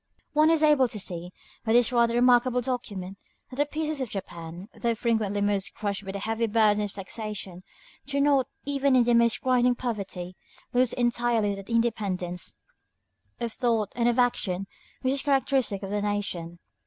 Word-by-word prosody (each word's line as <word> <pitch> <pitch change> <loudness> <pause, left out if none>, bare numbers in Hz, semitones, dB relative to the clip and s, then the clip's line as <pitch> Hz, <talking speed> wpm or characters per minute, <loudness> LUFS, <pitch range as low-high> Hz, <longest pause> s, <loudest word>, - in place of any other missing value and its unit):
One 305 +1 +5
is 325 -1 +3
able 295 -4 +5
to 215 - -5
see, 175 -2 -3 0.3
by 220 -1 +1
this 240 0 +4
rather 235 -1 +3
remarkable 245 0 +4
document, 205 -7 -4 0.3
that 255 - -9
the 290 0 +2
peasants 310 0 -2
of 255 - -3
Japan, 175 -2 -7
though 235 -1 -1
frequently 215 -3 0
almost 200 -1 0
crushed 205 -1 -3
by 195 - -5
the 200 - -4
heavy 225 +3 -1
burdens 210 -1 +3
of - - -15
taxation, 200 -2 -6 0.5
do 280 0 0
not, 280 -3 +3 0.2
even 280 -1 +2
in 250 - +6
the 240 0 +2
most 235 0 +3
grinding 250 -1 +3
poverty, 195 -7 -4 0.4
lose 250 -1 +3
entirely 240 -3 +1
that 195 +1 -9
independence 200 -6 -1 0.8
of 235 -2 -3
thought 230 -5 0
and 240 0 +2
of 240 - 0
action 205 -7 +1 0.4
which 260 +1 +2
is 275 - 0
characteristic 265 -7 +1
of 195 - -5
their 205 0 0
nation. 195 -5 -3
230 Hz, 170 wpm, -27 LUFS, 200-250 Hz, 0.8 s, in